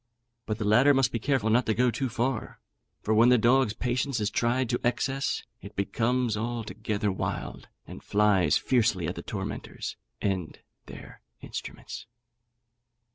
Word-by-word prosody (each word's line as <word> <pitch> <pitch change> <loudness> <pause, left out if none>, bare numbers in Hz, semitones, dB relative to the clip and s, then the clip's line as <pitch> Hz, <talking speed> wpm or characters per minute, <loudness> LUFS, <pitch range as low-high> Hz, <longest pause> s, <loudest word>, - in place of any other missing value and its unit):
But 110 - -1
the 110 - -3
latter 125 +7 +5
must 135 -2 +3
be 115 - -2
careful 120 -3 +1
not 120 +2 +3
to 110 - +2
go 125 +2 +3
too 130 +2 -2
far; 120 +1 -2 0.4
for 110 - +1
when 115 +3 +6
the 125 - +6
dog's 120 0 +3
patience 125 +1 -1
is 105 -1 -1
tried 125 +3 +1
to 120 - 0
excess, 135 +3 0 0.2
it 100 - -11
becomes 120 +3 0
altogether 110 -2 -2
wild, 65 -9 -4 0.2
and - - -10
flies 100 -6 +3
fiercely 105 -8 +1
at - - -2
the - - -7
tormentors - - -5 0.2
and 95 -5 -2 0.3
their - - -11 0.2
instruments. - - -7
115 Hz, 150 wpm, -28 LUFS, 105-125 Hz, 0.4 s, when